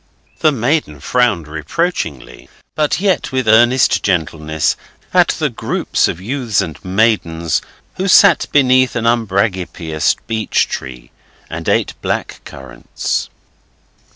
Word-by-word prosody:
'The 155 - +4
maiden 125 - -1
frowned 110 - +1
reproachingly, 80 - -4 0.2
but 150 +1 0
yet 190 -2 0
with 130 -3 -1
earnest 120 +4 +4
gentleness, 80 -4 -1 0.4
at - - +5
the - - 0
group - - -4 0.2
of 85 - -4
youths 120 +1 -2
and 80 - -4
maidens 90 -5 0 0.4
who 190 - -1
sat 190 -3 +5
beneath 130 -2 +3
an 115 - -2
umbragipeaous 95 - 0
beech 110 -1 0
tree 60 -2 -7 0.4
and - - -4
ate - - +1
black - - -3
currants. 65 -1 -5
110 Hz, 115 wpm, -16 LUFS, 80-130 Hz, 0.4 s, at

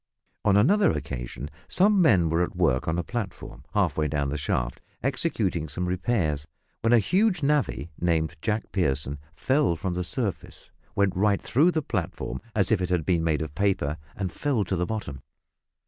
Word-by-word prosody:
On 100 -1 +4
another 200 - +5
occasion 65 +2 -4 0.2
some 200 +1 +4
men 95 - +5
were 80 +2 +1
at 90 - -1
work 80 -8 +1
on 80 +1 0
a 85 - 0
platform, 110 -2 -6
half - - +2
way 75 - +2
down 70 -1 -1
the 70 - -2
shaft, - - -2 0.2
executing 115 - 0
some 85 +5 -3
repairs, 90 -6 0 0.3
when 115 - +2
a 120 - +7
huge 185 - +2
navvy, 140 - 0
named 80 -2 +1
Jack 110 -1 -2
Pierson, 75 -5 -1 0.2
fell 135 - +2
from 90 +3 -3
the 90 +1 -2
surface, 100 +2 -3 0.2
went 100 -1 +2
right 100 +1 +2
through 140 - +3
the 160 -3 0
platform, 85 - -3
as 100 0 +2
if 105 -4 +3
it 90 - -1
had 90 -4 0
been 85 -3 +2
made 80 -1 +1
of 75 -2 -7
paper, 85 -5 0 0.2
and 95 -3 -3
fell 135 -8 0
to 95 0 -2
the 90 0 -1
bottom. 75 - -4
90 Hz, 180 wpm, -26 LUFS, 80-115 Hz, 0.3 s, a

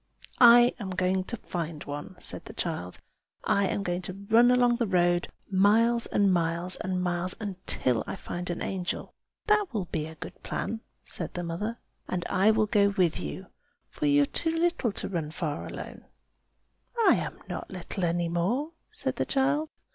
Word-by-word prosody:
"I 240 0 +8
am 200 -4 -4
going 185 0 0
to 235 - -5
find 165 -6 -5
one!" 145 +6 -6
said - - -4
the - - -9
child. 155 - -3 0.5
"I 200 -1 +2
am 200 - -1
going 175 -1 -1
to 190 +2 -8
run 235 +2 +7
along 245 -1 +4
the 235 -2 0
road, 175 -2 +2 0.2
miles, 225 +5 +4
and 200 -2 +3
miles, 170 +1 0
and 185 -1 -2
miles, 180 +1 -1
until 185 - -1
I - - -3
find 180 -1 -5
an 175 - -3
angel." 185 -2 -3 0.3
"That 425 -2 +3
will 210 -6 -2
be 155 -2 -3
a 160 - -10
good - - -9
plan!" 225 0 -3 0.2
said - - -1
the 175 - -3
mother. 205 +8 -3 0.3
"And 175 -1 -2
I 195 +3 +4
will 220 0 +4
go 205 -2 +3
with 170 - +2
you, 75 -5 -5 0.5
for 150 - -1
you 145 0 +5
are - - +2
too 325 - -1
little 340 -8 +1
to - - -4
run 165 -5 -3
far 155 -2 -4
alone." - - -8 1.0
"I - - +8
am - - -4
not - - -5
little 190 - -5
any 170 0 +1
more!" 205 - 0 0.2
said - - -3
the - - 0
child. 290 +3 +1
185 Hz, 180 wpm, -28 LUFS, 170-230 Hz, 1.0 s, I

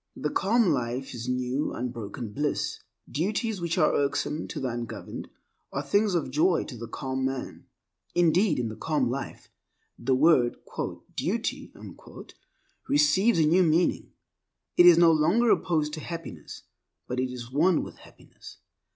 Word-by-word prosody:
The - - -3
calm 225 +4 +2
life 125 -2 -2
is 120 0 -5
new 125 +3 -1
unbroken 115 -2 -5
bliss. 145 +3 -2 0.3
Duties 205 - -2
which 170 0 -1
are 155 -4 +3
irksome 145 +2 -1
to - - -5
the 130 - -2
ungoverned 120 -1 -6 0.4
are 140 - -3
things 200 +6 +2
of 155 -6 -1
joy 165 +5 +2
to 130 - -9
the 115 0 -7
calm 130 +2 -4
man. 130 0 -4 0.5
Indeed, 175 +1 +3
in 120 -3 -1
the 110 - -7
calm 145 -4 0
life, 135 +2 -6 0.5
the 130 +2 +1
word 130 -4 +4 0.6
"duty" - - -2 1.2
receives 160 +10 +3
a 160 - +4
new 170 +5 +4
meaning. 170 0 +1 0.6
It 175 - +7
is 175 -2 +8
no 170 -1 +7
longer 175 +10 +3
opposed 155 -3 +1
to 155 - -4
happiness, 165 - -8 0.4
but 125 0 -3
it 130 0 -1
is 120 -1 -8
one 165 +5 +3
with - - -10
happiness. - - -15
150 Hz, 150 wpm, -27 LUFS, 125-170 Hz, 1.2 s, is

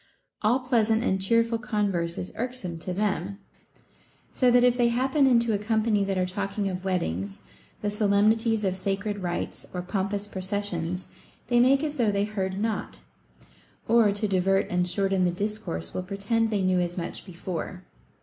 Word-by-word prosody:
All 235 +5 +2
pleasant 225 -3 +2
and 190 -5 +1
cheerful 230 +3 +2
converse 200 -7 -1
is 180 - -5
irksome 230 -9 -4
to 180 - -5
them; 195 0 -1 0.9
so 255 - +3
that 245 0 +5
if 245 -1 +5
they 240 -1 +3
hap 250 +3 0
pen 280 -1 +4
into 235 -3 +3
a 205 - 0
company 215 -1 +1
that 195 -1 -1
are 185 - +2
talking 200 +2 -2
of 185 -1 -4
weddings, 100 - -2 0.4
the 205 - 0
solemnities 215 +2 +2
of 190 -2 0
sacred 200 +2 -2
rites, 175 -2 -4
or 180 - -2
pompous 200 +2 -2
processions, 185 -3 -2 0.4
they 240 -1 +4
make 270 +4 +4
as 300 -1 -3
though 230 -4 +3
they 200 0 +1
heard 190 -3 -3
not, 220 +1 -3 0.9
or, 225 -2 +5
to 205 +1 -1
divert 195 0 +2
and 180 0 +1
shorten 195 0 +1
the 180 - +3
discourse, 175 - -3
will - - -2
pretend 200 +4 -1
they 205 -3 0
knew 185 -1 +2
as 175 0 -2
much 170 -1 -4
before. 180 0 -6
200 Hz, 170 wpm, -26 LUFS, 185-225 Hz, 0.9 s, that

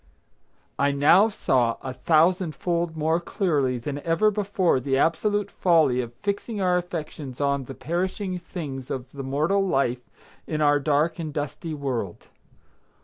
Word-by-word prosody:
I 140 - +3
now 155 +10 +5
saw 125 - +1
a 130 - -4
thousand 165 +3 +2
fold 170 0 -2
more 160 +2 +1
clearly 150 - 0
than 140 +4 -4
ever 165 +8 +2
before 195 -7 +1
the 135 +1 0
absolute 205 +7 +1
folly 155 -8 +3
of 120 -2 -6
fixing 205 +2 -2
our 180 -2 +2
affections 155 -6 -5
on 140 -2 0
the 135 - -8
perishing 185 +5 -2
things 140 -7 -7
of 130 -2 -5
the 140 - -7
mortal 155 +9 +1
life 130 -8 0 0.5
in 155 - -2
our 145 -1 +4
dark 150 +4 +1
and 155 -2 -4
dusty 150 +2 -4
world. 125 -10 -4
155 Hz, 145 wpm, -25 LUFS, 135-180 Hz, 0.5 s, now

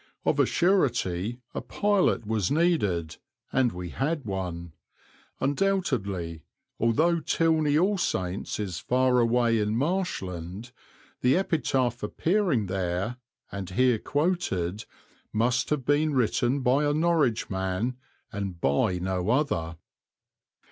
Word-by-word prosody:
Of - - +2
a - - +4
surety 120 - +1
a - - -3
pilot 205 - +1
was 105 -4 0
needed, 105 - +1 0.4
and 130 -3 +3
we 90 0 -6
had 145 - -2
one; 90 -4 -4 0.7
undoubtedly, 130 - -1 0.4
although 160 +10 +2
Tilney 155 -2 +2
All 190 +4 +2
Saints 95 - -2
is 95 -5 -3
far 125 +2 +2
away 115 -1 +3
in 105 +1 0
Marshland, 115 - -3 0.5
the 125 +6 +4
epitaph 135 -9 0
appearing 170 - +1
there, 95 +4 -2 0.3
and 100 -2 -5
here 125 +3 +2
quoted, 140 - -1 0.5
must 120 +3 +1
have 150 -4 -1
been 145 +1 +2
written 125 +2 +1
by 130 +3 +3
a 145 0 +1
Norwich 155 -10 +1
man, 95 +6 -2 0.3
and 100 -4 -4
by 85 +7 +1
no 90 +1 -2
other. 85 - 0
120 Hz, 115 wpm, -27 LUFS, 95-150 Hz, 0.7 s, a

